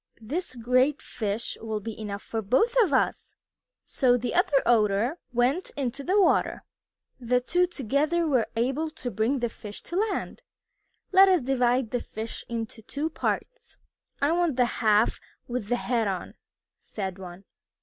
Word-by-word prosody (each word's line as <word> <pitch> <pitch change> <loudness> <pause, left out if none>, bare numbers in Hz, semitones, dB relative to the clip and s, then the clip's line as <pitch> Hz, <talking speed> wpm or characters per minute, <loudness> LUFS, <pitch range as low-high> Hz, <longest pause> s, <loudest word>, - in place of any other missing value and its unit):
"This 265 +6 -4
great 255 +4 +2
fish 215 +1 -3
will 220 -1 -3
be 225 +1 -6
enough 200 -2 -5
for 225 - -3
both 265 - +2
of 390 -9 +2
us!" 260 - 0 0.5
So 245 -2 +2
the 245 0 -3
other 295 -6 +3
Otter 225 - +2
went 250 +9 +1
into 275 0 -3
the 380 +7 +2
water. 390 - +2 0.6
The 250 0 +2
two 355 +8 +1
together 305 +3 0
were 260 -7 +2
able 270 +7 0
to 255 -5 -6
bring 225 +6 0
the 240 - +1
fish 210 -1 -10
to 345 - -7
land. 420 0 -2 0.7
"Let 385 0 +7
us 360 -7 +3
divide 250 -2 +1
the 245 - 0
fish 220 +1 -7
into 225 -1 -5
two 290 +8 -3
parts." - - -4 0.4
"I 285 +2 +2
want 340 -4 +1
the 250 -1 +4 0.2
half 215 0 +3 0.3
with 240 -4 -3
the 245 - +1
head 240 -2 0
on," 190 -2 -4 0.5
said 190 -3 -6
one. 180 0 -9
250 Hz, 160 wpm, -27 LUFS, 225-300 Hz, 0.7 s, Let